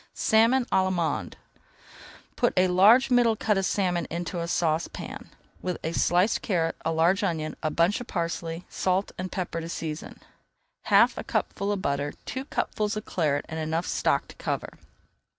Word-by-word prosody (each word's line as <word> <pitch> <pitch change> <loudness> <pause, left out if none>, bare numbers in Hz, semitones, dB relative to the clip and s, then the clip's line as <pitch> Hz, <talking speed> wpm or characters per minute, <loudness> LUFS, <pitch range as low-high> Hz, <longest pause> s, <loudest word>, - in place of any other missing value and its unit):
SALMON 230 +4 +3
À - - -29
L'ALLEMANDE 185 -3 0 1.0
Put - - +1
a 185 0 +4
large 215 +9 +6
middle 240 -2 +4
cut 215 0 +1
of 195 - 0
salmon 180 -4 0
into 175 +2 -4
a 170 - -3
saucepan, 165 -1 -2 0.3
with 180 -1 -2
a 160 - -1
sliced 180 +5 +2
carrot, 165 -5 0
a 165 - 0
large 165 +4 +3
onion, 160 -5 -2
a 155 - 0
bunch 170 +8 +1
of 245 - -8
parsley, 170 -1 -3
salt 190 +1 0
and 185 0 -4
pepper 175 -3 -3
to 165 - -6
season, 160 -2 -5 0.7
half - - +4
a - - -4
cupful 200 +1 -2
of 200 -2 -2
butter, 140 +1 -1
two 260 +1 -4
cupfuls 215 -6 -2
of 215 - -5
Claret, 150 -5 0
and 160 0 -5
enough 160 +2 -1
stock - - 0
to - - -12
cover. - - -3
180 Hz, 170 wpm, -26 LUFS, 165-205 Hz, 1.0 s, large